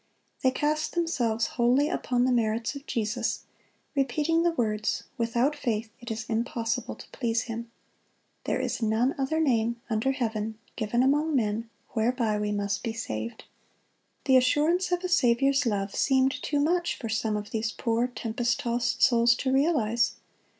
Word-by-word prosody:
They 260 - +4
cast 300 +3 -1
themselves 240 -10 0
wholly 245 +5 +2
upon 250 -6 0
the 255 - +2
merits 225 0 0
of 280 0 -10
Jesus, 215 -4 -1 0.5
repeating 300 +4 +1
the 345 - +3
words, 215 -8 -1
"Without 235 +5 +1
faith 225 -6 -2
it 240 - -9
is 220 -1 -4
impossible 230 0 -2
to - - -12
please 230 -2 -1
Him."(104) 230 0 -6 0.8
"There - - 0
is 250 -1 -2
none 225 +5 +2
other 275 +4 0
name 235 -6 +1
under 220 +5 +1
heaven 220 -3 -2 0.2
given 235 +2 +1
among 295 +3 +2
men, 225 -1 0 0.2
whereby 225 -2 0
we 210 0 -1
must 205 0 -1
be 230 -2 -3
saved."(105) 110 - -9
The 265 -2 +6
assurance 305 +8 +2
of 355 +1 0
a - - 0
Saviour's 275 -3 +3
love 200 -2 -1
seemed 265 -1 +3
too 290 - 0
much 345 +4 +1
for 230 - -5
some 220 -1 0
of 210 0 -6
these 220 0 -1
poor 230 +2 0
tempest 240 0 -2
tossed 240 0 0
souls 235 -2 +5
to 260 +2 -1
realize. 265 -6 +2
240 Hz, 155 wpm, -27 LUFS, 225-275 Hz, 0.8 s, The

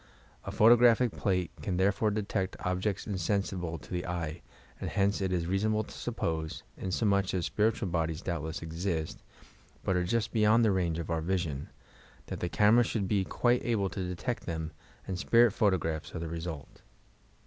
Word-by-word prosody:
A - - -4
photographic 120 +1 +6
plale 90 -3 0
can 90 -3 -2
Iherefore 100 +3 +2
detect 100 -2 -2
objects 90 +3 -1
insensi 100 0 -1
ble 85 -1 -3
to - - -15
the 90 0 -2
eye, 85 -2 -3 0.4
and - - -3
hence 100 0 +1
it 95 -1 0
is 85 -2 0
reasonable 105 +4 +1
to - - -12
suppose 80 -9 -3
— - - -34
inasmuch 100 0 0
as 90 - 0
spiritual 110 -1 +1
bodies 80 -1 -1
doubtless 80 -2 -3
exist, 80 0 -3 0.6
but 95 - +1
are 90 - +2
just 110 +4 0
beyond 110 +1 +4
the 110 - +4
range 85 -4 0
of 85 0 -4
our 80 -1 0
vision, 80 -5 -2 0.3
— - - -26
that - - -6
the 90 - -2
camera 110 +6 +5
should 110 -4 -1
be 100 0 +2
quite 120 +5 +1
able 105 -5 +1
to 95 -1 -4
detect 90 +7 -4
them, 80 -2 -3 0.4
and 95 -2 -3
spirit 120 +2 +5
photographs 90 -8 0
are - - -2
the 85 - -4
result. 80 -3 -6
95 Hz, 180 wpm, -30 LUFS, 85-105 Hz, 0.6 s, photographic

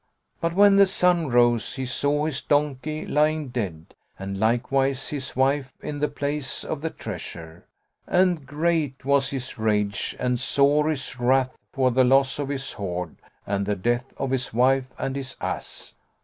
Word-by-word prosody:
But 170 0 -1
when 200 0 +6
the 200 -1 +7
sun 180 -3 +3
rose, 120 -1 +3
he 130 -1 -3
saw 145 +3 +1
his 155 -4 -2
donkey 150 +1 -1
lying 150 -1 +1
dead 95 -10 -5 0.2
and 95 0 -5
likewise 130 +4 +1
his 140 -3 -4
wife 135 +1 +1
in 145 -1 -5
the 150 - +1
place 145 -2 -3
of 150 - -4
the 160 - -2
treasure, 85 - -8 0.4
and 180 -4 +2
great 150 -3 -1
was 140 0 +3
his 130 -4 -5
rage 105 -2 0
and 125 -1 0
sore 145 +4 +3
his 135 -4 -3
wrath 130 +1 +2 0.2
for 130 -1 +2
the 130 +2 +4
loss 135 +2 +3
of 140 -1 -2
his 135 -1 -3
hoard 90 -4 -4 0.3
and 100 0 -1
the 105 - +1
death 120 +6 -1
of 135 - -2
his 130 -1 -1
wife 130 +1 +3
and 135 - -3
his 135 -1 -5
ass. - - -5
135 Hz, 165 wpm, -24 LUFS, 120-145 Hz, 0.4 s, the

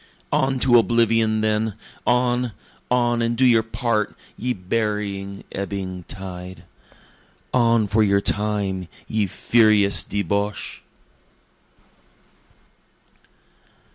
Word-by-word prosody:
On 135 0 +1
to 120 -2 +6
oblivion 115 0 +2
then! 110 -1 0 0.3
On, 125 -1 +1 0.4
on, 120 -1 +2
and 115 0 0
do 130 - +4
your 115 -3 +5
part, 110 -1 -1 0.2
ye 125 +2 -2
burying, 100 -1 -3
ebbing 95 -2 -5
tide! 90 -2 -8 0.9
On 115 -3 +3
for 110 +2 +1
your 100 -2 +3
time, 100 -3 -1 0.2
ye 110 -2 0
furious 105 0 +3
debouche! 100 0 -2
105 Hz, 90 wpm, -22 LUFS, 100-115 Hz, 0.9 s, to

